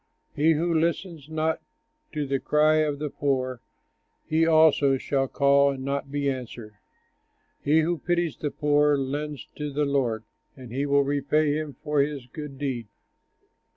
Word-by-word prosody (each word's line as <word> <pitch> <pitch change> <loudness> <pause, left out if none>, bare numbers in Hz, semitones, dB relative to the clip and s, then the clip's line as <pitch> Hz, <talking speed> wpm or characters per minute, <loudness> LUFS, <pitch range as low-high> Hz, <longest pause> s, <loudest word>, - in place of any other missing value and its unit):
He 160 +3 +4
who 165 +2 0
listens 165 -1 -1
not 160 0 -1 0.5
to 150 -2 -2
the 135 0 -1
cry 155 +2 +3
of 150 -2 +1
the 150 -1 -4
poor, 130 -3 -1 0.6
He 160 +1 +2
also 155 -4 +5
shall 135 0 -1
call 140 +1 +4
and 130 -1 -7
not 140 0 -2
be 145 0 -1
answered. 120 -5 -5 0.9
He 155 +3 +4
who 170 +1 -1
pities 175 -1 0
the 150 - -3
poor, 150 0 +2
lends 145 +2 -4
to 150 -1 -4
the 145 +1 0
Lord 125 -6 0 0.3
And 125 -3 -11
he 140 +4 -1
will 140 0 +4
repay 145 +2 +1
him 155 -2 -4
for 150 -1 0
his 140 -3 -2
good 140 +2 -8
deed. 130 -5 -3
145 Hz, 155 wpm, -26 LUFS, 135-155 Hz, 0.9 s, also